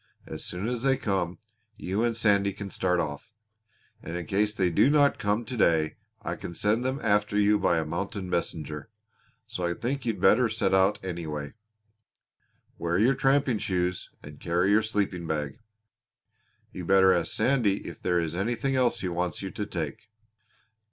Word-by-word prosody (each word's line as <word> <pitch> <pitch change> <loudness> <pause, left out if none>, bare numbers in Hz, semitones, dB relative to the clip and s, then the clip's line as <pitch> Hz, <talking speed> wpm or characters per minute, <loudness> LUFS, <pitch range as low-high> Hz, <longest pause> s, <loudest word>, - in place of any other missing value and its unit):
As - - -7
soon 90 +4 -4
as 120 -1 -2
they 135 0 +2
come 95 -8 -1 0.4
you 100 +4 -1
and 115 -1 0
Sandy 100 -3 +2
can 100 0 -7
start 90 -1 +1
off; 75 +5 -4 0.7
and 85 +2 -5
in 90 - -5
case 105 0 +1
they 95 -4 0
do 105 - +4
not 145 -1 +4
come 105 +3 0
to 125 - -5
day 80 -7 +2 0.3
I - - -3
can 85 - -8
send 110 +6 +1
them 130 +2 -1
after 105 -1 +2
you 105 0 +4
by 85 - +2
a 80 - 0
mounted 100 +6 -4
messenger. 80 -2 -3 0.6
So 90 - -6
I 85 0 0
think 135 +3 -3
you'd 110 -4 -1
better 115 +6 +4
set 110 -2 0
out 95 +2 +4
anyway. 80 -5 -5 1.3
Wear 85 +1 0
your 115 +7 +4
tramping 135 -3 +2
shoes 90 -2 -1
and 75 0 -11
carry 90 +3 +1
your 105 +2 +5
sleeping 100 -5 -2
bag. 75 -3 -3 1.1
You 90 - -7
better 95 +1 +5
ask 85 -2 0
Sandy 120 -7 +1
if - - -9
there 90 -1 +1
is 85 -1 -1
anything 120 +7 -1
else 125 -2 +2
he 95 - -2
wants 90 +1 -2
you 95 - -4
to 105 - -4
take." 80 +2 -5
95 Hz, 175 wpm, -27 LUFS, 85-110 Hz, 1.3 s, your